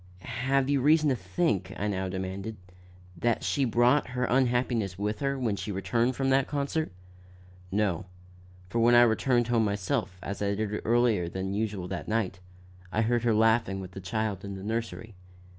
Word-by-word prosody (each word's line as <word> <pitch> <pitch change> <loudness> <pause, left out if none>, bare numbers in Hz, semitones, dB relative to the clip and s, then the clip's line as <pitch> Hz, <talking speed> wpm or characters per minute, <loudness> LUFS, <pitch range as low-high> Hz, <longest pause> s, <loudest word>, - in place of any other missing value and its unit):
"Have 135 0 +2
you 140 -1 +2
reason 155 +2 +4
to 130 - +2
think," 95 - -1
I 105 - -1
now 95 -2 -2
demanded, 95 +3 -4 0.6
"that 115 +6 0
she 140 - +1
brought 120 +4 +3
her 125 - +1
unhappiness 120 -6 +1
in 100 - -6
with 105 +1 -1
her, 140 -1 -1
when 115 -6 0
she 100 +2 -5
returned 115 +6 0
from 135 +1 0
that 135 0 +3
concert?" 145 -1 -1 0.8
"No; 95 -4 0 0.6
for 115 +6 -2
when 120 +1 +5
I 120 - +8
returned 120 +1 +2
home 115 -2 +3
myself, 100 -2 -1
as 100 - -5
I 100 0 +1
did 105 0 -2
earlier 115 -7 +2
than 95 +2 -3
usual 100 -3 -2
that - - -5
night, 110 -4 -1 0.5
I 110 - +1
heard 120 +1 +1
her 115 -2 +2
laughing 110 -3 +3
with 95 -1 -7
the 95 - -8
child 100 +1 -2
in 100 -1 -5
the 95 - -8
nursery. 110 0 -4
110 Hz, 180 wpm, -28 LUFS, 95-120 Hz, 0.8 s, I